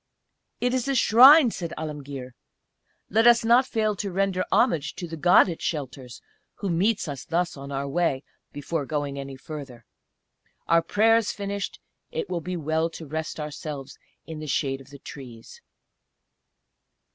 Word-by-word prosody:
"It 245 Hz, 0 st, 0 dB
is 255 Hz, 0 st, -1 dB
a 275 Hz, -, 0 dB
Shrine," 255 Hz, +3 st, +7 dB
said 170 Hz, -4 st, -5 dB
Alemguir. 140 Hz, -4 st, -6 dB, 0.8 s
"Let 225 Hz, +4 st, +4 dB
us 235 Hz, -1 st, +5 dB
not 245 Hz, +3 st, +5 dB
fail 215 Hz, -3 st, 0 dB
to 200 Hz, 0 st, -3 dB
render 190 Hz, 0 st, 0 dB
homage 165 Hz, -, +2 dB
to 175 Hz, -, -6 dB
the 165 Hz, -, -6 dB
God 175 Hz, +3 st, +5 dB
it 170 Hz, -3 st, -5 dB
shelters, 130 Hz, -5 st, -5 dB, 0.3 s
who 200 Hz, -3 st, -3 dB
meets 195 Hz, +5 st, +1 dB
us 140 Hz, -3 st, -6 dB
thus 175 Hz, +1 st, -1 dB
on 140 Hz, 0 st, -9 dB
our 140 Hz, 0 st, -3 dB
way, 140 Hz, -2 st, 0 dB, 0.3 s
before 145 Hz, 0 st, -4 dB
going 145 Hz, -2 st, -3 dB
any 135 Hz, 0 st, -7 dB
further. 130 Hz, -4 st, -9 dB, 0.8 s
Our 165 Hz, 0 st, +4 dB
prayers 220 Hz, +5 st, +3 dB
finished 200 Hz, -1 st, -5 dB, 0.3 s
it 190 Hz, -, -4 dB
will 175 Hz, -2 st, -2 dB
be 180 Hz, +2 st, -4 dB
well 160 Hz, +1 st, 0 dB
to 165 Hz, 0 st, -9 dB
rest 160 Hz, +2 st, -5 dB
ourselves 150 Hz, -2 st, -7 dB, 0.3 s
in 160 Hz, -1 st, -7 dB
the 155 Hz, -, -7 dB
shade 135 Hz, -1 st, -1 dB
of 135 Hz, -, -16 dB
the 140 Hz, -, -11 dB
trees." 125 Hz, -5 st, -11 dB
160 Hz, 155 wpm, -25 LUFS, 140-200 Hz, 0.8 s, Shrine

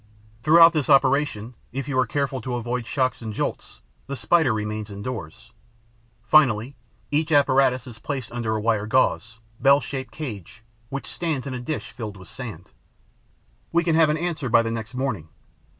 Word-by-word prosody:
Throughout 165 Hz, +4 st, +7 dB
this 155 Hz, -3 st, -1 dB
operation, 135 Hz, -4 st, +3 dB, 0.2 s
if 135 Hz, +1 st, -4 dB
you 140 Hz, -, -3 dB
are 125 Hz, -, +2 dB
careful 140 Hz, +2 st, -2 dB
to 125 Hz, -2 st, -3 dB
avoid 120 Hz, 0 st, -3 dB
shocks 130 Hz, -3 st, 0 dB
and 110 Hz, -2 st, -6 dB
jolts, -, -, -4 dB, 0.3 s
the 140 Hz, -, -4 dB
Spider 160 Hz, -1 st, +3 dB
remains 105 Hz, 0 st, -3 dB
indoors. 110 Hz, 0 st, -7 dB, 0.7 s
Finally, 125 Hz, -1 st, +3 dB, 0.4 s
each 155 Hz, +2 st, 0 dB
apparatus 135 Hz, -3 st, +3 dB
is 120 Hz, -4 st, -11 dB
placed 130 Hz, -2 st, -5 dB
under 115 Hz, -2 st, -2 dB
a -, -, -1 dB
wire 110 Hz, -1 st, 0 dB
gauze, 115 Hz, -1 st, +1 dB, 0.2 s
bell 140 Hz, +2 st, +6 dB
shaped 130 Hz, -2 st, -6 dB
cage, 110 Hz, -, -8 dB, 0.3 s
which 140 Hz, +1 st, -5 dB
stands 160 Hz, -6 st, -3 dB
in 135 Hz, -, -4 dB
a 125 Hz, -, -4 dB
dish 145 Hz, +5 st, -5 dB
filled 105 Hz, -5 st, -7 dB
with 95 Hz, +1 st, -13 dB
sand. 110 Hz, -9 st, -9 dB, 1.0 s
We 170 Hz, +1 st, +2 dB
can 165 Hz, -1 st, +1 dB
have 160 Hz, -1 st, +5 dB
an 150 Hz, -, +1 dB
answer 155 Hz, -5 st, -3 dB
by 115 Hz, 0 st, +5 dB
the 115 Hz, -, -2 dB
next 115 Hz, +1 st, -5 dB
morning. 125 Hz, -, -3 dB
130 Hz, 170 wpm, -24 LUFS, 110-140 Hz, 1.0 s, Throughout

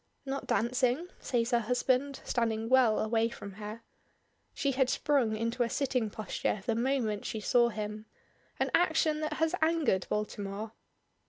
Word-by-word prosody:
"Not 275 Hz, 0 st, -4 dB
dancing?" 250 Hz, +7 st, +1 dB
says 240 Hz, -1 st, 0 dB
her 240 Hz, -, +4 dB
husband, 255 Hz, +4 st, 0 dB
standing 225 Hz, -2 st, -1 dB
well 255 Hz, -4 st, +5 dB
away 225 Hz, +1 st, +1 dB
from 200 Hz, -3 st, -8 dB
her. 215 Hz, +2 st, -7 dB, 0.7 s
She 280 Hz, -, 0 dB
had 260 Hz, -1 st, +2 dB
sprung 255 Hz, -9 st, +1 dB
into 230 Hz, +3 st, -2 dB
a 235 Hz, -, +2 dB
sitting 250 Hz, -4 st, 0 dB
posture 210 Hz, -1 st, -3 dB
the 230 Hz, -, +1 dB
moment 235 Hz, -3 st, 0 dB
she 220 Hz, -, -3 dB
saw 235 Hz, +3 st, +3 dB
him, 215 Hz, -1 st, -5 dB, 0.5 s
an -, -, 0 dB
action 315 Hz, -2 st, +3 dB
that 310 Hz, 0 st, -2 dB
has 320 Hz, +2 st, 0 dB
angered 315 Hz, -, +2 dB
Baltimore. 210 Hz, 0 st, -3 dB
235 Hz, 150 wpm, -31 LUFS, 220-275 Hz, 0.7 s, well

